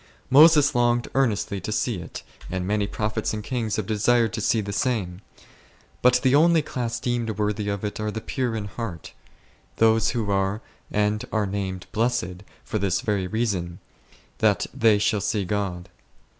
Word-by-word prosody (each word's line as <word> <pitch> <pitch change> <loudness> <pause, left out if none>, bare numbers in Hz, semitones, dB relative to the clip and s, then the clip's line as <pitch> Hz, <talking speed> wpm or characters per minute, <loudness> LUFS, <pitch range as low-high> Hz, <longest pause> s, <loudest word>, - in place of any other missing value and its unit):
Moses 150 0 +7
longed 120 -1 +1
earnestly 110 -6 0
to 105 - -4
see 110 0 0
it, 85 - -8 0.3
and 90 -1 -3
many 105 +1 0
prophets 110 +1 -2
and 105 - -5
kings 115 -3 -2
have 110 - -2
desired 115 +2 +2
to - - -3
see 115 - +2
the 100 -1 -4
same: 100 -6 -1 0.8
but 125 0 +5
the 130 - +3
only 160 +2 +5
class 120 -2 -3
deemed 120 -4 -2
worthy 105 0 -1
of 100 0 -3
it 105 - -4
are 110 0 -2
the 110 - -4
pure 125 0 -2
in 105 -2 -3
heart, 100 -5 -7 0.6
those 115 0 +3
who 110 -4 -2
are, 95 +1 0 0.3
and 105 0 0
are 110 -2 +1
named 95 -2 -4
" - - -36
blessed," 115 -6 -1 0.2
for 110 - -3
this 95 0 0
very 105 -6 -1
reason, 90 -5 -2 0.6
that - - +2
"they 110 -2 +4
shall 105 0 +1
see 100 0 -1
God6." 95 -3 -2
105 Hz, 170 wpm, -24 LUFS, 100-120 Hz, 0.8 s, Moses